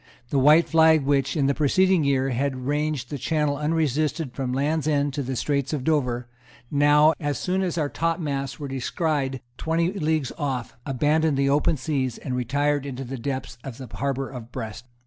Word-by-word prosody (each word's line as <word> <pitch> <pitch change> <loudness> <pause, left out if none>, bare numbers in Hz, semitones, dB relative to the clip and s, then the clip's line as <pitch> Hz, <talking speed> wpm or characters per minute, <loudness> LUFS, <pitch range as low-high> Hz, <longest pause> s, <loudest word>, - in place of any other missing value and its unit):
The 140 - +2
white 150 +5 +6
flag, 160 -2 +5
which, 140 +3 +1
in 140 - +2
the 140 - +3
preceding 180 +4 +3
year, 135 -1 +1
had 130 0 -2
ranged 145 -2 -1
the 145 - -4
Channel 150 0 0
unresisted 155 -1 0
from 130 -1 -3
the 125 - -1
Land's 150 +2 0
End 145 -2 +1
to 145 - -2
the 130 0 -3
Straits 140 +2 -1
of 140 -4 -2
Dover, 125 -5 0 0.4
now, 150 +2 +5
as 145 -3 -1
soon 185 +1 -1
as 180 -3 -1
our 150 -3 +1
topmasts 145 -4 -2
were 145 - -4
descried 135 0 -1 0.2
twenty 165 +3 0
leagues 155 - 0
off, 130 -5 -3
abandoned 150 +3 +2
the 140 0 +2
open 150 +2 +2
sea, 135 -2 -1
and 130 -3 -2
retired 140 +3 0
into 135 -1 -5
the 130 0 -6
depths 130 -1 -4
of 130 -4 -7
the 130 -4 -9
harbour 135 -1 -1
of 125 -2 -9
Brest. 115 -1 -6
145 Hz, 185 wpm, -24 LUFS, 130-155 Hz, 0.4 s, white